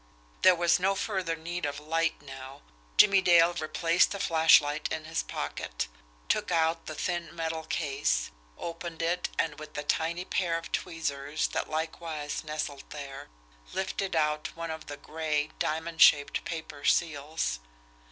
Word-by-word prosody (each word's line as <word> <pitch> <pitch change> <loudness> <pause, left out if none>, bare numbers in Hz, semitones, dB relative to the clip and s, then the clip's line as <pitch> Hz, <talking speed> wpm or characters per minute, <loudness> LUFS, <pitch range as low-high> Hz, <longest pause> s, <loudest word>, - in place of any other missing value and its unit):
There 185 -1 +7
was 170 0 +3
no 195 +2 +2
further 190 -5 -1
need 170 +2 -5
of 145 0 -2
light 165 0 -1
now. 135 -1 -10 0.3
Jimmie 200 -2 +7
Dale 175 -2 +6
replaced 165 +1 +2
the 200 - -4
flashlight 155 -3 +4
in 155 - -3
his 165 0 -1
pocket, - - -4 0.4
took - - +1
out 165 0 +1
the 155 - -5
thin, 170 0 -3
metal 160 -1 -3
case, 135 - 0 0.3
opened 170 -1 -5
it, 175 +2 0
and 150 -2 -1
with 155 0 -10
the 145 - -3
tiny 165 +4 0
pair 170 -3 0
of 165 - -8
tweezers 155 -3 -2
that - - -2
likewise 155 -1 -3
nestled 150 -2 -4
there, 140 -2 -8 0.4
lifted 190 -1 -2
out 150 -1 0
one 165 0 -4
of 160 -1 -7
the 145 - -6
gray, 155 0 -2
diamond 160 +1 -2
shaped 145 -1 +6
paper 160 -3 -6
seals. 150 - +1
160 Hz, 150 wpm, -29 LUFS, 150-170 Hz, 0.4 s, There